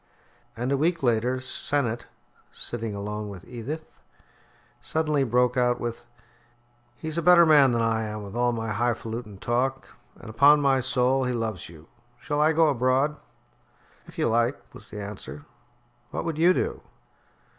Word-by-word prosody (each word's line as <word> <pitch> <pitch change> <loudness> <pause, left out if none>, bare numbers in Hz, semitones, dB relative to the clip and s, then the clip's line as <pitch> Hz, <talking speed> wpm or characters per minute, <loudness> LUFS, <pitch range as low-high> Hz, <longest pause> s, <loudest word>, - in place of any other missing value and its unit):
And 125 +3 -2
a 140 - +2
week 165 +2 0
later 120 +1 +1
Sennett, 130 -2 -2 0.4
sitting 115 -3 -4
alone 105 +1 -5
with 100 -3 -10
Edith, 140 +7 -7 0.8
suddenly 150 -3 0
broke 125 0 +2
out 125 -1 +2
with: 120 0 -5 0.9
"He's 160 +6 -4
a - - -1
better 175 0 +7
man 145 -4 +6
than 115 -1 +1
I 110 -1 0
am, 105 0 -5
with 100 +2 -9
all 120 0 +2
my 115 -2 -3
high 120 +2 +1
falutin' 110 -3 -7
talk, 130 +5 -1 0.3
and, - - -13
upon 140 +7 +5
my 135 -2 +3
soul, 130 +1 +1
he 125 - -1
loves 110 -8 -3
you. 80 -1 -15 0.3
Shall 145 0 -1
I 155 +1 +4
go 160 0 +4
abroad?" 135 +3 +1 0.9
"If - - -15
you - - +1
like," 120 +4 +1
was 105 - -13
the 105 - -7
answer. 105 +8 -8 0.6
"What - - -4
would 160 -2 -3
you 180 +3 +5
do?" - - -2
125 Hz, 160 wpm, -26 LUFS, 115-145 Hz, 0.9 s, better